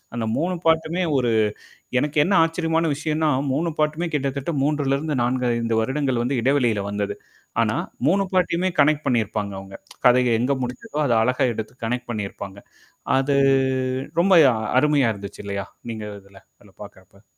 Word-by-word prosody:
அந்த 115 -1 -2
மூணு 180 +3 0
பார்ட்டு 160 0 +2
மே 185 - +1
ஒரு 120 -3 +1 0.7
எனக்கு 150 +3 -1
என்ன 195 - 0
ஆச்சரியமான 165 0 0
விஷயம்ன்னா 155 +1 -1 0.2
மூணு 165 +5 0
பார்ட்டு 155 +1 0
மே 175 - 0
கிட்டத்தட்ட 140 +2 -2
3 145 +1 0
4, 125 +1 0
5 115 -1 0
வருடங்கள் 130 +1 -1
வந்து 125 +1 -1
இடைவெளியில 125 -6 +2
வந்தது. 100 0 -3 0.5
ஆனா - - 0 0.3
3 195 +4 +3
பார்ட் 185 -1 +2
டயுமே 185 +2 +1
கனெக்ட் 150 +1 +3
பண்ணியிருப்பாங்க 110 -4 -1
அவங்க. 95 0 -12 0.3
கதைய 125 -1 +5
எங்க 125 +4 +1
முடிஞ்சதோ 145 - -4
அத 120 - +2
அழகா 125 +2 +2
எடுத்து 110 +3 -6
கனெக்ட் 125 +1 -3
பண்ணியிருப்பாங்க. 100 -2 -6 0.6
அது 140 +1 +1 0.8
ரொம்ப 190 +2 +3 0.5
அருமையா 145 -4 +3
இருந்துச்சு 100 0 -9
இல்லையா? 100 0 -4 0.2
நீங்க 110 -1 -6 0.2
இதுல 100 0 -17 0.2
அதுல 100 - -20
பார்கறப்ப. 100 0 -16
130 Hz, 150 wpm, -22 LUFS, 110-155 Hz, 0.8 s, கதைய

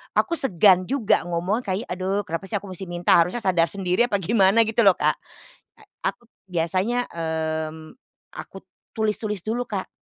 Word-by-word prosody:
Aku 335 - +2
segan 185 - +4
juga 235 -9 +1
ngomong 180 +7 -2
kayak, 195 +3 -3
"Aduh 190 +3 -1
kenapa 175 -1 -5
sih 205 - -11
aku 200 0 -9
masih 185 +1 -6
minta, 175 0 +2
harusnya 180 +8 +1
sadar 180 -5 +2
sendiri." 185 +4 0
Apa 200 -5 -1
gimana 200 +2 +4
gitu 220 0 +1
loh, 195 - +7
Kak. - - 0 0.6
Nah, - - -20 0.2
aku - - -4 0.2
biasanya, 185 +8 0
mmm, 160 -1 -4 0.4
aku - - -10 0.3
tulis-tulis 210 -3 -2
dulu, 240 +3 -2
Kak. 195 -3 -4
190 Hz, 160 wpm, -23 LUFS, 175-220 Hz, 0.6 s, loh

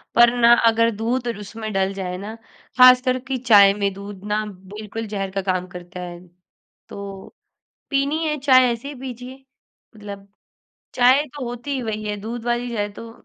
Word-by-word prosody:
पर 240 0 +6
ना 235 0 +6 0.2
अगर 230 0 +3
दूध 240 +3 -2
और 235 - -3
उसमें 215 +2 -7
डल 195 0 0
जाए 185 -2 -4
ना 205 +4 -7 0.4
खास 255 0 +8
कर 255 0 0
की 265 - 0
चाय 205 -5 +6
में 200 -1 -1
दूध 200 0 -10
ना 210 +1 0 0.3
बिल्कुल 215 +1 -6
ज़हर 195 -2 -4
का 195 +1 -2
काम 185 -1 -2
करता 180 0 -10
है। 175 -1 -7 0.7
तो, 200 - -9 0.5
पीनी 280 +3 0
है 300 0 -1
चाय 255 -2 +5
ऐसे 235 +3 -5
ही 290 - -7
पीजिए, 255 +1 -8 0.5
मतलब 200 -2 -10 0.7
चाय 255 +3 +5
तो 275 - -5
होती 245 +4 -7
ही 260 - -2
वही 215 -2 -4
है 210 -1 -3
दूध 230 +2 -6
वाली 240 0 -1
चाय 205 -1 -1
तो 230 +2 -10
225 Hz, 180 wpm, -21 LUFS, 200-250 Hz, 0.7 s, खास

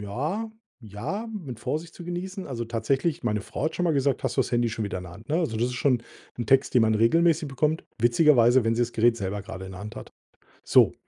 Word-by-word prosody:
ja, 150 - -3 0.3
ja, 115 - -5
mit 140 - -7
Vorsicht 165 +3 -4
zu 175 - -10
genießen. 185 +2 -5
Also 120 -4 -4
tatsächlich, 130 +8 -1
meine 105 -3 0
Frau 135 - -5
hat 160 - -1
schon 180 - 0
mal 165 - +2
gesagt: 140 -2 +1
„Hast - - -1
du - - +4
das - - -1
Handy 120 0 +2
schon 110 -1 -3
wieder 100 -2 -3
in 90 - -8
der 85 - -10
Hand,“ 110 +5 -14
ne? 155 - +1
Also, 155 -11 -1
das 120 +2 +1
ist 125 - -4
schon 125 -3 +1 0.4
'n 120 - -3
Text, 135 0 +3
den 125 - +6
man 110 0 +3
regelmäßig 155 +7 +3
bekommt. 150 +4 0 0.2
Witzigerweise, 120 -1 +5
wenn 115 0 +2
sie's 120 0 0
Gerät 115 +1 +3
selber 100 -1 -3
gerade 95 -3 -8
in 95 - -9
der 95 - -9
Hand 105 +1 -8
hat, - - -9 0.5
so. - - +5
120 Hz, 245 wpm, -26 LUFS, 110-155 Hz, 0.5 s, den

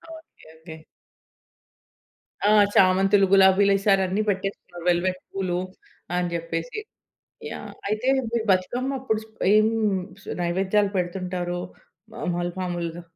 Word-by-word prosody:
Okay, 320 - -17
okay. 160 0 -11 1.7
ఆ! - - +5 0.2
చామంతులు, 195 +1 +4
గులాబీలు 195 +1 +6
వేసారు 195 0 +3
అన్ని 190 +3 0
పెట్టేసుకున్నారు 190 -3 -4
వెల్వెట్ 180 +1 +1
పూలు 185 -2 -2 0.6
అని 180 -1 -1
చెప్పేసి. 165 - -4 0.7
యాహ్! - - -7 0.2
అయితే 215 +4 -2 0.3
మీరు 235 -2 0
బతుకమ్మ 240 +9 0
అప్పుడు 220 -4 -1
స్ - - -17 0.3
ఏం 215 0 +5 0.8
నైవేద్యాలు 195 +4 +1
పెడుతుంటారు 180 -1 -2 0.6
మాముల్ 175 0 -2
మాములుగా? 175 -2 -4
185 Hz, 105 wpm, -24 LUFS, 175-200 Hz, 1.7 s, గులాబీలు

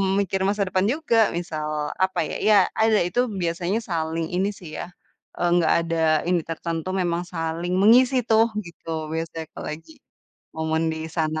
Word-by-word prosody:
mmm, 195 0 +1
mikir 195 -1 -1
masa 205 0 +1
depan 185 +1 +1
juga, 235 -9 +2
misal 155 -3 -3 0.4
apa 190 - -1
ya - - -4
ya 210 - +7 0.2
ada 220 -1 +4
itu 245 +7 0 0.2
biasanya 175 +5 -1
saling 165 -1 -1
ini 190 +3 +1
sih 175 - -10
ya, - - -4 0.5
eee, 175 - +1
nggak 165 -2 +3
ada 165 0 -1 0.3
ini 180 -1 +3
tertentu, 165 +1 -4
memang 175 0 -1
saling 165 +2 -2
mengisi 250 +5 +6
tuh 225 0 +5 0.2
gitu, 170 -1 -14 0.3
biasanya 165 0 -4
kalau - - -7
lagi 160 - -10 0.6
momen 160 0 0
di 160 - -5 0.2
sana. 155 -1 0
175 Hz, 170 wpm, -24 LUFS, 165-200 Hz, 0.6 s, ya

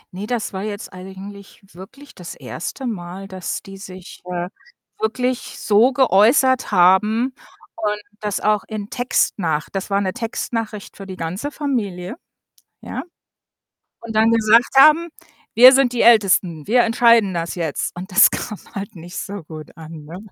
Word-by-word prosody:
Ne, 205 +3 -6
das 230 -4 -3
war 190 - -4
jetzt 205 -1 -6
eigentlich 195 +2 -11
wirklich 265 +11 -13
das 175 -2 -9
1. 265 +9 -7
Mal, 190 -3 -6
dass 185 -2 -5
die 195 -1 -11
sich, 185 -2 -11
äh, 175 -1 -4 0.5
wirklich 250 +3 -2
so 220 +5 +4
geäußert 255 +1 +3
haben 210 +7 +3 0.4
und 210 -1 -1 0.2
das 210 -2 -2
auch 210 -1 +1
in 215 -2 -6
Textnach 170 -10 -1
das 195 +1 -4
war 200 0 +1
'ne 185 -1 -2
Textnachricht 225 -3 -5
für 195 -1 -9
die 190 - -7
ganze 180 - -4
Familie, 205 -12 -3 0.7
ja? - - -6 1.0
Und 230 -1 -7
dann 220 +1 +4
gesagt 230 +2 +3
haben, 310 +4 +7 0.5
wir 250 +3 +10
sind 260 -2 +3
die 240 - 0
Ältesten, 190 -8 +3
wir 245 +2 +4
entscheiden 230 -3 +4
das 170 0 -3
jetzt. 165 -2 -3
Und 185 +3 -8
das 185 - +7
kam 210 -4 -5 0.2
halt 195 -1 -6
nicht 175 +2 -10
so 200 -3 -6
gut 155 0 -11
an, 160 -1 -10
ne? 165 +4 -9
205 Hz, 155 wpm, -20 LUFS, 185-230 Hz, 1.0 s, wir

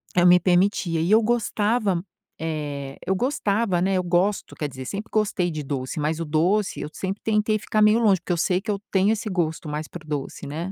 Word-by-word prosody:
Eu 175 - +4
me 180 0 +7
permitia 175 -2 +2
e 170 - 0
eu 220 +1 +6
gostava 220 -2 +1
m 170 +1 -2 0.9
eh, - - -16
eu 190 - +2
gostava, 210 - 0
né, 190 +1 +1
eu 185 - 0
gosto, 180 +4 0
quer 150 -3 -3
dizer, 130 -1 -8
sempre 200 +8 -5
gostei 205 -5 +1
de 155 -2 -4
doce, 135 +1 -4
mas 155 +2 -1
o 165 - -2
doce 175 +7 +1
eu - - -5
sempre 195 +2 -4
tentei 215 0 +1
ficar 215 +1 -1
meio 210 +1 +6
longe, 205 -5 +4
porque 180 - -5
eu 170 - -1
sei 180 +2 +1
que 215 - -9
eu 205 - +1
tenho 195 +2 +3
esse 220 0 -2
gosto 165 -3 -2
mais 150 +1 -4
para 170 -3 -10
o - - -19
doce, 145 -3 -4
né. 165 +6 -4
185 Hz, 230 wpm, -24 LUFS, 165-210 Hz, 0.9 s, me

